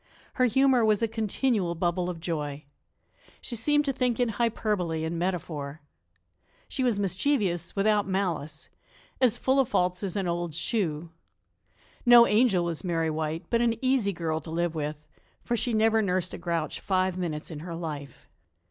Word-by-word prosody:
Her 255 - +3
humor 260 0 +4
was 215 0 +3
a - - +3
continual 220 -4 0
bubble 175 +1 0
of 175 -2 -5
joy. 150 -3 -4 0.7
She 240 - -3
seemed 295 +6 +2
to 275 - 0
think 250 -2 0
in 245 -1 +2
hyperbole 210 -7 -1
and 165 +1 -3
metaphor. 155 -5 -3 0.9
She 260 - -2
was 235 -5 +1
mischievous 190 - 0
without 205 0 +2
malice, 175 -6 -2 0.5
as 250 -4 +4
full 265 +1 +2
of 265 - +2
faults 180 0 +1
as 195 -3 -3
an 195 -3 -1
old 170 -2 -2
shoe. 170 -5 -1 0.9
No 240 -1 +8
angel 210 -5 +3
was 170 -2 -2
Mary 165 -3 0
White, 155 +1 -3
but 235 0 +3
an 235 -1 +2
easy 255 -5 +2
girl 160 -3 -2
to 160 - -10
live 170 +1 -1
with, 150 -1 -3 0.5
for 240 - -1
she 240 +1 -1
never 220 0 +3
nursed 185 -3 0
a - - -6
grouch 170 -3 -2
five 185 -1 0
minutes 170 -3 -4
in 155 - -6
her 170 +1 -6
life. 150 -5 -7
185 Hz, 165 wpm, -27 LUFS, 165-225 Hz, 0.9 s, No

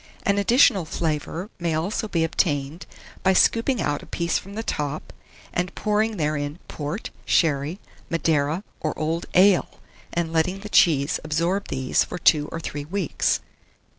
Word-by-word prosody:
An 200 0 +2
additional 205 -2 +5
flavour 160 +5 -3
may 170 -2 0
also 190 +7 -1
be 170 -5 0
obtained 155 -1 -1 0.3
by 190 - +4
scooping 230 +6 +3
out 145 -5 -1
a - - -13
piece 170 -1 -1
from 200 +1 -11
the 225 - -3
top, 150 -6 -3 0.4
and 180 +1 -2
pouring 215 0 0
therein 150 -1 -1
port, 150 +8 -5
sherry, 155 +2 +1 0.3
Madeira, 160 +1 +1 0.2
or 155 - -3
old 165 +2 -2
ale, 185 0 +4 0.3
and 170 -1 -2
letting 180 +4 +1
the 210 - -7
cheese 150 -8 +4
absorb 170 +6 0
these 130 -1 +1
for 180 - -6
2 155 -3 +3
or 165 - -4
3 145 -3 -5
weeks. 185 0 0
165 Hz, 150 wpm, -24 LUFS, 150-195 Hz, 0.4 s, additional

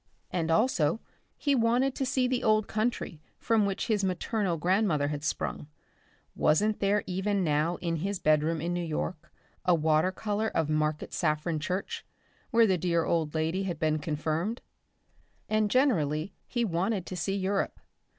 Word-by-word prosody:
And 165 -2 -1
also, 170 - +2 0.4
he 285 - +1
wanted 250 +2 +2
to 270 -1 -2
see 260 -1 +1
the 250 -1 -1
old 215 -2 +3
country 215 -8 -2 0.2
from 220 -3 +2
which 195 - -2
his 210 -3 +1
maternal 190 0 0
grandmother 175 -4 +2
had 150 -1 -4
sprung. 155 - -2 0.7
Wasn't 210 +8 +2
there 200 +1 +2
even 190 +2 0
now 155 +2 +1
in 170 -2 -1
his 195 +5 -2
bedroom 155 0 +2
in 170 +2 -1
New 175 0 -1
York 165 +1 -4 0.3
a 180 -1 +4
water 155 +2 +2
colour 210 +2 -2
of 160 -7 0
Market 155 0 -1
Saffron 155 0 0
church, 180 +5 -3 0.5
where 230 0 +5
the 190 -4 +2
dear 170 -1 +1
old 160 -2 0
lady 160 +4 0
had 175 -4 -3
been 155 -1 +1
confirmed? 155 - -2 0.9
And 215 -1 +1
generally 175 - +1
he 240 -1 0
wanted 190 +1 -1
to 185 - -6
see 195 +3 -1
Europe. 195 0 -1
180 Hz, 160 wpm, -29 LUFS, 155-215 Hz, 0.9 s, where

